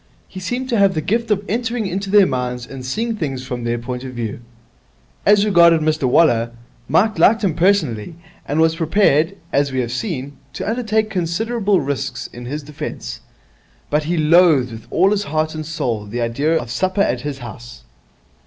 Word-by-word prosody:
He 190 - -9
seemed 245 +8 -3
to 235 -4 +1
have 195 -2 +4
the - - +1
gift 230 +7 -1
of 205 -1 0
entering 230 +1 -1
into 195 +1 -3
their 205 0 +6
minds 125 -3 -3
and 135 0 -9
seeing 225 - -2
things 135 -9 -4
from 125 -2 -5
their 120 0 0
point 125 +1 -5
of 130 -1 -7
view. 115 -3 -4 0.9
As 205 0 +5
regarded 170 -5 +5
Mr 155 -2 0
Waller, 120 -6 +3 0.4
Mike 205 +9 +2
liked 225 +1 +4
him 185 -5 +2
personally, 165 - +1 0.3
and 145 +3 -1
was 160 0 +3
prepared, 165 0 +2 0.2
as 140 0 +2
we 130 - -1
have 120 -1 -4
seen, 140 - -4 0.2
to - - -5
undertake 220 -1 0
considerable 200 +3 0
risks 135 -2 -3
in 120 0 -9
his 145 +4 -5
defence; 145 0 -7 0.7
but 150 +1 +1
he 170 +2 -1
loathed 155 -5 +4
with 110 -1 -10
all 190 +4 +3
his 205 -1 0
heart 155 -1 -1
and 155 -1 -6
soul 120 -10 -3
the 120 +4 -4
idea 140 +8 +1
of 120 -1 -7
supper 185 +9 0
at 125 -10 +1
his 145 0 -4
house. 120 - -10
155 Hz, 185 wpm, -19 LUFS, 125-200 Hz, 0.9 s, their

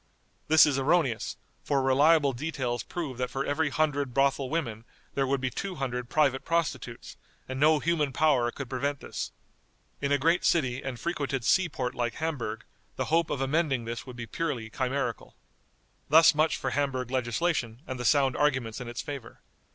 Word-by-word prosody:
This 160 0 +7
is 140 -3 +1
erroneous, 135 -4 +1 0.3
for 140 -2 +1
reliable 140 +2 +4
details 125 -3 -2
prove 140 - -5
that 125 -1 -1
for 135 +2 -3
every 150 +1 0
hundred 145 -3 0
brothel 135 -1 +2
women 120 -9 -2 0.3
there 135 -1 0
would 135 +1 +1
be 130 -1 -2
two 195 +5 -4
hundred 125 -4 -3
private 140 -3 +2
prostitutes, 170 -2 -2 0.3
and 130 0 -5
no 155 +2 +5
human 155 -3 0
power 135 -5 +3
could 135 +2 -6
prevent 140 +2 -2
this. - - -5 0.7
In 140 0 -1
a 145 - +4
great 165 +5 +2
city 130 -5 +2
and 130 -3 -5
frequented 140 -5 -2
sea 190 +5 +3
port 125 -4 -3
like 120 -1 -2
Hamburg, 130 -9 -3 0.3
the - - -2
hope 165 0 +3
of 135 - -2
amending 135 -3 +1
this 115 +2 -5
would 125 - -8
be 120 -1 -6
purely 115 -4 -3
chimerical." 130 -2 -2 0.7
Thus 160 +3 +7
much 155 +1 +2
for 135 - -3
Hamburg 130 -3 -1
legislation, 125 0 -1
and 130 -1 -5
the - - -3
sound 135 -1 +3
arguments 130 -5 0
in 125 - -6
its 120 - -4
favor. 140 -6 -8
135 Hz, 175 wpm, -28 LUFS, 125-155 Hz, 0.7 s, This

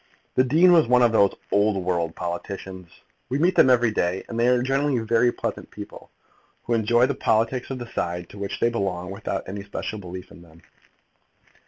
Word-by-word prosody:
The 130 - +4
dean 160 +8 +5
was 165 -7 +5
one 125 0 +4
of 120 - +4
those 100 -3 +3 0.2
old 100 0 +2
world 85 -3 -1
politicians, 90 +1 -6 0.4
we 135 - 0
meet 175 +5 +2
them - - +6
every 120 -2 +4
day, 90 -2 -1
and 115 - -5
they 120 - +3
are 125 -1 +3
generally 135 0 +1 0.3
pleasant - - -5
people, - - -11 0.5
who 120 - -2
enjoy 120 +2 +3
the 140 - -1
politics 120 +1 0
of 135 - -4
the 120 -1 -9
side 90 0 -3
to 100 - -12
which 100 0 -4
they 120 - +2
belong 95 -5 -3
without 100 - -4
any 100 +2 -5
special 105 +1 -5
belief 90 -1 -9
in - - -14
them. 85 -1 -19
110 Hz, 190 wpm, -24 LUFS, 95-125 Hz, 0.5 s, them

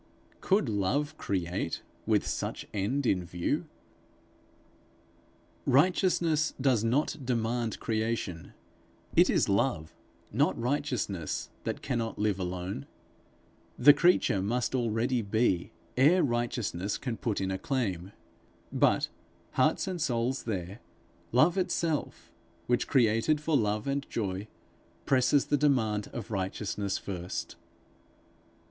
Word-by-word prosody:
Could 195 -6 +2
Love 115 +9 0
create 90 -2 -2 0.2
with - - +3
such - - -3
end 120 +8 -1
in 95 -6 +2
view? 85 0 -2 2.0
Righteousness 165 0 +3
does 130 -5 +2
not 135 +7 +1
demand 120 -2 -1
creation; 110 -6 -2 0.6
it - - +6
is - - +3
Love, 100 -5 0 0.4
not - - +1
Righteousness, 125 - -2
that - - -3
cannot 115 -4 -2
live 105 -2 0
alone. 90 -4 -4 0.9
The 145 +4 +8
creature 150 - +3
must 120 +7 -1
already 120 0 +1
be, 100 -4 +1 0.2
ere 155 +8 +5
Righteousness 120 -6 -1
can 125 -3 -3
put 110 -2 -2
in 95 -1 -1
a 95 - -2
claim. 95 -9 -2 0.6
But, - - +3 0.4
hearts - - +2
and 180 -3 -3
souls 125 0 0
there, 100 -1 -4 0.5
Love 155 +10 +4
itself, 165 -4 -2 0.3
which 120 0 +1
created 120 +4 +3
for 150 +1 0
love 105 -3 +1
and 140 0 -2
joy, 100 -2 -3 0.6
presses 130 +1 +3
the 145 - +2
demand 115 -8 +1
of 115 -1 -7
Righteousness 100 0 -2
first. 90 -2 -5
115 Hz, 110 wpm, -29 LUFS, 100-140 Hz, 2.0 s, The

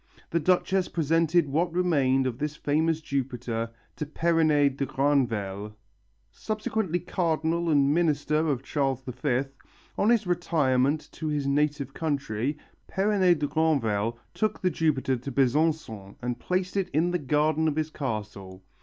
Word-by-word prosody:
The 170 - +2
Duchess 185 +2 +2
presented 165 +1 +2
what 165 +5 0
remained 140 -7 +2
of 125 -1 -3
this 150 0 -2
famous 155 +2 0
Jupiter 125 -5 -3 0.3
to 150 - -3
Perronet 155 -3 +2
de 140 - -1
Granvelle. 110 -8 0 0.6
Subsequently 215 -4 -2
cardinal 165 0 -1
and 140 -2 +4
minister 155 -1 +1
of 135 -3 -1
Charles 135 -3 -1
V, 130 +1 -1 0.6
on 210 - +3
his 230 -3 +3
retirement 155 -5 +1
to 160 - -5
his 150 -2 -1
native 140 -1 0
country, 140 -3 -2 0.3
Perronet 190 -3 +2
de 150 - -1
Granvelle 115 -9 +1 0.2
took 215 -1 -1
the 185 - +1
Jupiter 140 -6 +1
to 130 +3 -6
Besançon 130 -6 0
and 125 -1 -3
placed 185 +1 -2
it 195 -2 0
in 170 +3 +1
the 180 - 0
garden 155 +2 +1
of 150 - 0
his 155 0 -1
castle. 105 -8 -5
150 Hz, 140 wpm, -27 LUFS, 130-165 Hz, 0.6 s, and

